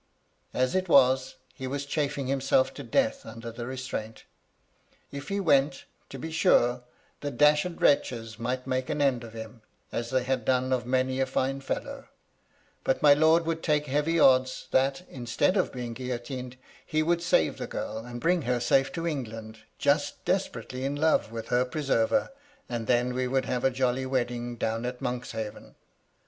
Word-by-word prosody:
As 130 0 +1
it 185 -1 0
was, 130 -2 +4 0.2
he 130 - -6
was 140 +2 -3
chafing 140 -1 -1
himself 135 0 +2
to - - -8
death 275 0 0
under 115 +1 -8
the 120 +1 -6
restraint. 130 -4 -5 0.9
If 140 0 -7
he 200 0 -1
went, 140 -6 +2 0.2
to 135 - -7
be 160 +5 -6
sure, 125 -8 +3 0.4
the 150 +4 +2
wretches 115 -5 +1
might 125 +2 -2
make 130 -1 -2
an 150 - -1
end 135 -4 +2
of 115 -1 -10
him, 110 0 -9 0.3
as 115 0 -3
they 130 0 +1
had 130 -1 -1
done 130 +1 +1
of 120 -2 -1
many 130 +1 +1
a 135 - +2
fine 135 +1 -1
fellow; 135 - -5 0.8
but 130 - 0
my 145 -1 +9
lord 160 +3 +4
would 165 0 -2
take 150 -2 +1
heavy 150 +4 +1
odds 130 -2 +4
that, 135 +6 +2
instead 125 - 0
of 190 - +1
being 120 -2 -5
guillotined, 125 +1 -5 0.3
he 155 0 0
would 170 +1 +1
save 125 - +2
the - - -4
girl, 110 - -4
and 120 +1 -7
bring 175 +5 +2
her 125 -2 0
safe 135 +3 +2
to 165 - -3
England, 115 -8 -5 0.2
just 145 0 0
desperately 130 - -2
in 140 +1 -1
love 155 -6 +2
with 115 -1 -6
her 125 +1 +3
pre 140 +4 -4
server, 135 - +2 0.4
and 120 -2 -4
then 125 0 +2
we 130 0 -1
would 130 0 0
have 125 -1 -2
a 135 - +5
jolly 130 0 0
wedding 120 -2 -2
down 115 0 -2
at 125 0 -4
Monkshaven. 120 -4 -5
130 Hz, 175 wpm, -28 LUFS, 120-145 Hz, 0.9 s, my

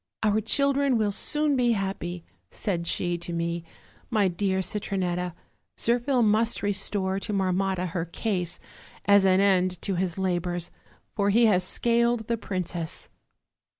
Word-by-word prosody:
'Our 215 0 +2
children 280 +3 +2
will 210 -2 +1
soon 295 +7 +1
be 245 -2 +3
happy,' 190 -4 -3 0.3
said 170 -4 -3
she 175 0 -1
to 175 - -5
me, 170 0 -2 0.5
'my 210 -5 +2
dear 190 +1 0
Citronetta; 180 -3 -2 0.4
Zirphil 240 +2 +1
must 220 +2 +2
restore 195 -1 0
to 210 - -5
Mar 190 -2 +1
motta 185 -1 -1
her 165 0 -2
case, 180 -1 -2 0.5
as 200 -1 +5
an 185 0 +4
end 185 -2 +2
to 195 - -1
his 180 -1 -1
labors, 175 -2 -1 0.4
for 200 -1 +1
he 230 +4 +5
has 185 -4 +4
scaled 235 +3 +1
the 235 - 0
princess.' 180 -5 -4
195 Hz, 145 wpm, -26 LUFS, 180-220 Hz, 0.5 s, as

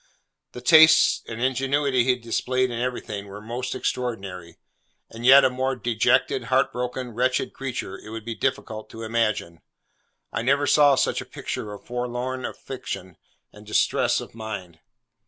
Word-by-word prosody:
The 125 - -8
taste 160 +4 +6
and 115 0 -6
ingenuity 130 +1 +1
he 130 - -2
had 125 - -8
displayed 130 +2 0
in 115 - -4
everything 115 -5 -4
were 100 +1 -9
most 120 +4 -4
extraordinary; 95 -9 -4 0.5
and 115 +1 -9
yet 135 +1 +9
a - - +4
more 130 +1 -1
dejected, 120 +1 +1
heart 130 +3 +2
broken, 125 0 -4
wretched 125 +3 0
creature, 130 -8 -5
it - - -12
would 110 0 -7
be 115 - -3
difficult 110 -1 -3
to 115 - -9
imagine. 110 -7 -1 0.7
I - - -1
never 140 +4 +2
saw 145 -2 +5
such - - 0
a - - -9
picture 105 - -6
of 105 - -10
forlorn 125 +1 -3
affliction 95 -9 -7 0.4
and 105 - -14
distress 105 0 +1
of - - -9
mind. 100 -7 -7
120 Hz, 155 wpm, -24 LUFS, 110-130 Hz, 0.7 s, yet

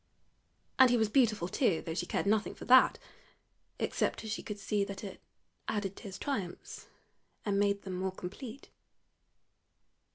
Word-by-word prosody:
And 260 -1 +9
he 245 - +4
was 220 -2 +2
beautiful 215 -7 +3
too, 185 - +1
though 160 - -4
she 175 +1 -2
cared - - -1
nothing 215 +1 +1
for - - -9
that, 255 +1 +7 0.8
except - - -1
as 220 - -5
she 225 - -2
could 210 - -6
see 205 0 0
that 200 0 -6
it 195 -2 -8 0.5
added 200 -2 -2
to - - -11
his 190 -2 -6
triumphs 195 -11 -5 0.6
and 200 -1 +1
made 200 0 +1
them 185 -2 -4
more 190 0 -1
complete. 220 +8 -8
205 Hz, 160 wpm, -32 LUFS, 190-220 Hz, 0.8 s, And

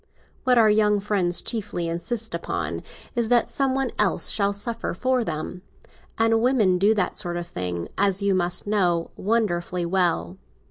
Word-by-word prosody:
What 250 -1 +4
our 225 -2 +6
young 210 -1 +3
friends 195 -4 +1
chiefly 205 -7 -3
insist 215 +7 -3
upon - - -3 0.3
is 235 -3 -1
that 240 -1 +4
some 270 -1 0
one 270 -3 -1
else 210 -3 +2
shall 200 -1 +1
suffer 210 0 -3
for 255 +4 +1
them; 165 0 -5 0.6
and 225 0 +3
women 220 -8 +3
do 210 +3 +4
that 190 -4 0
sort 175 -4 0
of 175 - -4
thing, 90 - -4
as 195 -1 +2
you 200 -1 +1
must 180 -1 0
know, 180 -5 +1
wonderfully 180 -5 -1
well." 130 - 0
200 Hz, 165 wpm, -24 LUFS, 175-225 Hz, 0.6 s, our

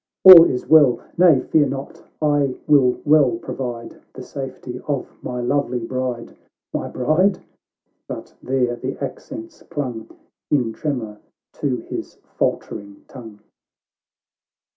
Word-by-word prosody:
— - - -70
all 180 -3 +12
is 125 - -2
well 145 -5 +5 0.2
Nay, 170 -7 +5
fear 150 -3 +2
not 140 +5 -7
— - - -48 0.2
I 135 -3 0
will 135 -5 +3
well 145 -5 +4
provide 120 -1 -7
The 130 - -9
safety 130 -2 -7
of 140 -3 -2
my 125 0 -4
lovely 125 0 0
bride 125 0 -4 0.2
— - - -69
My - - -3
bride?"— 175 +9 +1 0.7
but - - -8
there 125 -2 0
the 130 +2 -5
accents 310 - -8
clung 125 -6 -5 0.4
In 125 -6 +1
tremor 115 -9 -4 0.3
to - - -2
his - - -6 0.2
faltering 100 -1 -3
tongue. 110 -5 -12
130 Hz, 130 wpm, -21 LUFS, 125-150 Hz, 0.7 s, all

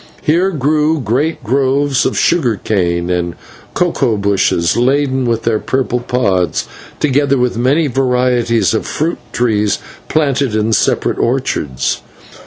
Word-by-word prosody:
Here 175 +5 +2
grew 155 0 +1
great 135 +6 -1
groves 135 +3 +1
of 130 - -3
sugar 140 -10 +2
cane, 90 -4 -1
and 85 -1 -1 0.4
cocoa 140 -10 +1
bushes 100 -4 +1
laden 130 +1 +1
with 115 -1 -1
their 115 -2 +1
purple 130 0 -1
pods, 100 -9 0 0.3
together 140 -1 +2
with 125 -1 0
many 135 +7 +2
varieties 125 -3 +1
of 110 - -2
fruit 165 +3 -2
trees 105 -4 +1 0.3
planted 140 -6 0
in 110 +1 +1
separate - - +1
orchards. 75 - -1
125 Hz, 125 wpm, -15 LUFS, 110-140 Hz, 0.4 s, Here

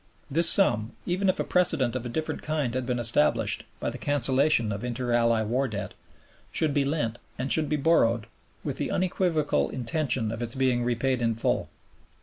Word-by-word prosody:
This 165 +4 +7
sum, 115 - +4
even 185 +2 0
if 185 - 0
a - - +1
precedent 160 -9 +1
of 125 -1 -4
a - - -6
different 155 +6 -4
kind 150 -6 -2
had 130 -1 -3
been 125 -1 -1
established 115 -10 +1
by - - -3
the 125 - -9
cancellation 135 -1 +1
of 100 +2 -5
Inter 125 0 -3
Ally 115 -1 +2
War 125 +5 -1
Debt, 105 -4 -6 0.6
should 155 -3 0
be 145 -1 +2
lent 135 -6 -2 0.2
and 130 +1 -3
should 155 -2 +1
be 150 - +1
borrowed 120 -7 +2 0.4
with - - -4
the - - -3
unequivocal 175 -4 0
intention 125 -2 -2
of 115 +1 -6
its 120 +1 -4
being 130 -2 +1
repaid 125 +1 -1
in 115 -1 0
full. 115 - -1
130 Hz, 185 wpm, -26 LUFS, 115-155 Hz, 0.6 s, This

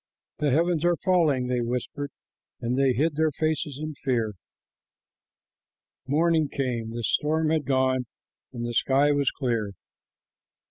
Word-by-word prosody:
"The 150 - +2
heavens 165 +3 +2
are 175 0 +3
falling," 165 -9 +2
they 125 -1 0
whispered, 125 +4 -3 0.5
and 120 0 -1
they 135 -1 +3
hid 155 +6 +1
their 160 0 +3
faces 155 -1 -2
in 155 0 -4
fear. 115 -5 0 1.7
Morning 160 +1 +2
came, 125 -5 -2
the 115 +1 -5
storm 155 +6 +1
had 155 -3 +1
gone, 130 -1 +1 0.4
and 120 -2 -5
the 120 - -3
sky 140 +4 +3
was 145 -2 +2
clear. 115 -7 -2
140 Hz, 135 wpm, -26 LUFS, 125-155 Hz, 1.7 s, are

